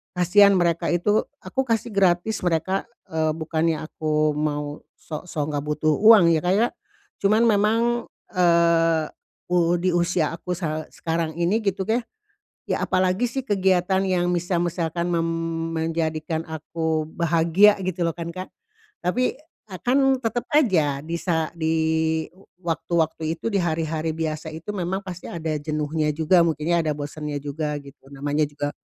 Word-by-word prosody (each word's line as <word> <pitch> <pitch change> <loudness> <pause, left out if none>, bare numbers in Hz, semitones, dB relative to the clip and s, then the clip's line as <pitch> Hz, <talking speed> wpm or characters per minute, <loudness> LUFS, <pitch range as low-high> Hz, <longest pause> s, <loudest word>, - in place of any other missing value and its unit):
kasihan 200 +3 +5
mereka 170 -2 +1
itu 205 +5 +2 0.2
aku 265 - -2
kasih 230 -1 -1
gratis 190 +2 +2
mereka, 175 +3 0 0.2
eee, 160 -1 0
bukannya 160 0 -1
aku 155 -1 0
mau 150 -1 -2 0.2
sok-sok 155 -1 -5
enggak 145 0 -2
butuh 155 +1 +1
uang 220 -4 +8
ya, 155 - 0
Kak, 180 +1 +2
ya, 235 - +4 0.6
cuman 215 +3 +4
memang, 210 +1 +3 0.6
eee, 170 -2 +3 0.5
u 175 -1 +3
di 185 +1 +1
usia 175 -2 +1
aku 180 +2 -7
sa 155 -3 -3
sekarang 165 -1 -2
ini 185 +6 +2
gitu 195 -1 0
ya, 230 +3 +2 0.7
ya - - -1
apalagi 185 +5 +1
sih 265 +1 -3
kegiatan 190 -2 +2
yang 180 -1 +1
misa 175 0 0
misalkan 170 0 -1
mem 165 -1 +1 0.5
menjadikan 160 0 -2
aku 160 0 -2
bahagia 170 +5 +4
gitu 180 -1 -2
loh - - +1
kan, 170 -1 -6
Kak? 185 0 -6 0.5
Tapi 245 +8 +1
e 300 - -17
kan 255 +3 +3 0.2
tetep 235 +1 -1
aja 165 - +3
bisa 165 0 -1
di 160 0 +1 0.9
waktu-waktu 160 -1 -1
itu - - -7
di 200 - +1
hari-hari 160 -1 -1
biasa 160 -1 -3
itu 165 +6 -7
memang 185 0 -2
pasti 185 -2 -8
ada 160 -2 -4
jenuhnya 155 0 -1
juga, 165 +3 +4
mungkin 155 +1 -1
ya - - +4
ada 155 - -1
bosennya 145 0 -5
juga 150 +1 -3
gitu, 140 -1 -16
namanya 145 +2 -1
juga, 145 0 -3
170 Hz, 150 wpm, -23 LUFS, 155-185 Hz, 0.9 s, uang